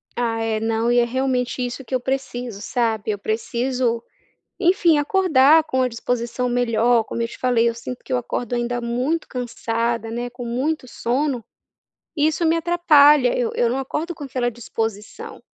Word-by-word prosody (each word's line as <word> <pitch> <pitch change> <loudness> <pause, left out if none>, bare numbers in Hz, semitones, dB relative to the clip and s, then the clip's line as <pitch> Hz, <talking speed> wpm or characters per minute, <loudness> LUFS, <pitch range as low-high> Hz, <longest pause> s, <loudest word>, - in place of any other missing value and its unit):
Ah, 230 -2 -1
é 225 -1 -1
não, 225 +1 0
e 245 - +4
é - - +4
realmente 255 0 -1
isso 245 +2 -6
que 265 - -10
eu 255 - +2
preciso 245 -4 -4
sabe. 220 -1 -1
Eu 205 - -4
preciso 235 +2 -1 0.6
enfim 350 -3 +4
acordar 315 -2 +4
com 260 -4 -1
a 255 - +2
disposição 240 +1 -2
melhor, 240 -1 +2
como 235 - -4
eu 230 - 0
te - - -11
falei 245 -2 +2
eu 235 - +1
sinto 240 +2 -8
que - - -5
eu - - +3
acordo 245 0 -4
ainda 240 0 -1
muito 250 +7 -1
cansada, 230 -2 -2
né, 240 +1 -3
com 245 0 -8
muito 260 +4 -2
sono, 250 +1 -1 0.7
isso 310 +2 +1
me 320 - +3
atrapalha 300 -6 +5
eu 240 -2 0
eu 240 - +2
não 250 +3 -1
acordo 300 +6 -3
com 295 - -8
aquela 250 -2 -1
disposição. 220 -2 -5
245 Hz, 175 wpm, -22 LUFS, 235-270 Hz, 0.7 s, atrapalha